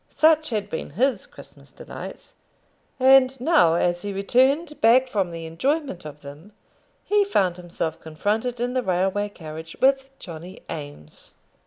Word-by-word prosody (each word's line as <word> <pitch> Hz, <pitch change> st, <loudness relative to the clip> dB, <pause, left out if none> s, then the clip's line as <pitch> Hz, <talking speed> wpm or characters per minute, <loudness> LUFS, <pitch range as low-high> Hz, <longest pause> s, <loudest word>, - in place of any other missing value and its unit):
Such 315 Hz, 0 st, +3 dB
had 210 Hz, -4 st, -2 dB
been 160 Hz, -, -5 dB
his 265 Hz, +2 st, +1 dB
Christmas -, -, -15 dB
delights; -, -, -10 dB, 0.7 s
and 265 Hz, 0 st, +5 dB
now, 255 Hz, -, +4 dB
as 175 Hz, 0 st, 0 dB
he 205 Hz, -, -4 dB
returned 265 Hz, -, +1 dB
back 245 Hz, +4 st, +5 dB
from 200 Hz, -7 st, -1 dB
the 165 Hz, -1 st, -7 dB
enjoyment 260 Hz, -, -2 dB
of 150 Hz, -1 st, -9 dB
them, 150 Hz, +8 st, -12 dB, 0.5 s
he 415 Hz, 0 st, +3 dB
found 190 Hz, -, +1 dB
himself 170 Hz, -2 st, -4 dB
confronted 215 Hz, +10 st, -2 dB
in 245 Hz, +1 st, -1 dB
the 255 Hz, -, +1 dB
railway 190 Hz, +1 st, 0 dB
carriage 160 Hz, -3 st, -9 dB
with 270 Hz, 0 st, +3 dB
Johnny 175 Hz, +1 st, -10 dB
Eames! 145 Hz, -, -10 dB
205 Hz, 145 wpm, -24 LUFS, 165-260 Hz, 0.7 s, and